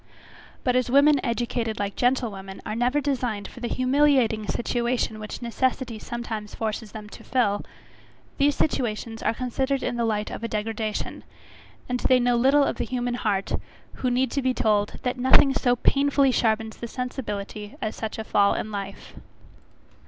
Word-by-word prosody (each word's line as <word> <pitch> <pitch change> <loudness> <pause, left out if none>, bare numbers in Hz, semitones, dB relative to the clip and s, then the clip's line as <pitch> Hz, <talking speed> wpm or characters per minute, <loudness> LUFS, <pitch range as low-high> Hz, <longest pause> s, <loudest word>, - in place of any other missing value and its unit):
But 250 -1 +2
as 255 -1 +2
women 280 +2 +5
educated 235 -2 -1
like 200 -1 -2
gentlewomen, 215 -7 -1
are 215 - -3
never 245 +5 +2
designed 245 -8 -1
for - - -12
the 240 - -3
humiliating 255 -5 +2
situation 240 -2 -1
which 215 +3 -7
necessity 240 -1 -1
sometimes 225 -3 -5
forces 220 -1 -3
them 215 -1 -8
to - - -12
fill; 205 -6 +1 0.8
these 285 0 +4
situations 230 -5 -1
are 230 - +1
considered 265 +2 -1
in 240 - -1
the 235 - +1
light 215 -2 -1
of - - -6
a - - 0
degradation; 215 0 -3 0.6
and 250 0 -1
they 255 0 +4
know 245 0 +3
little 270 +4 +5
of - - -1
the - - -1
human 245 -1 -2
heart, 205 -5 -1 0.4
who 255 - 0
need 250 0 +1
to 280 - 0
be 255 -1 +1
told, 210 -1 +1
that 250 0 -1
nothing 260 +2 +6
so 245 -2 +2
painfully 275 +1 +3
sharpens 220 -2 +1
the 235 - -5
sensibility 210 -5 -5
as 215 - -3
such 220 -1 -4
a 220 - -3
fall 200 -2 +3
in 215 - -3
life. 200 -1 -6
240 Hz, 165 wpm, -25 LUFS, 215-255 Hz, 0.8 s, nothing